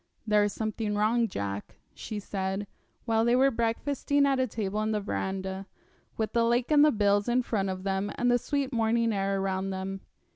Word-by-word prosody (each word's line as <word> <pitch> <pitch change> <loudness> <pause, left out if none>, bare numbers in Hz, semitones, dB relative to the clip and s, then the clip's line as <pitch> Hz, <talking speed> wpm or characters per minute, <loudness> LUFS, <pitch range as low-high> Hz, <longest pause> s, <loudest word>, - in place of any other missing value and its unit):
'There 210 -1 +4
is 205 - -1
something 215 0 -2
wrong, 225 +3 +2
Jack,' 100 - -5 0.2
she 215 - -6
said, 195 0 -3 0.4
while 225 -1 +2
they 235 +1 +3
were 270 +2 +4
breakfasting 275 +5 0
at 275 -1 +2
a 260 - +2
table 210 -2 -2
in 215 0 0
the 215 - +1
verandah, 190 -1 -3 0.5
with 220 -1 -2
the 235 -1 +3
lake 240 +4 +1
and 295 -1 +7
the 305 - +6
bills 205 -1 +2
in 250 +1 +2
front 200 -5 -1
of 185 0 -4
them 195 +1 -1
and 245 0 +2
the 245 - +3
sweet 280 0 -2
morning 230 0 +2
air 195 0 0
around 190 0 -1
them. 190 0 -4
215 Hz, 195 wpm, -28 LUFS, 195-240 Hz, 0.5 s, and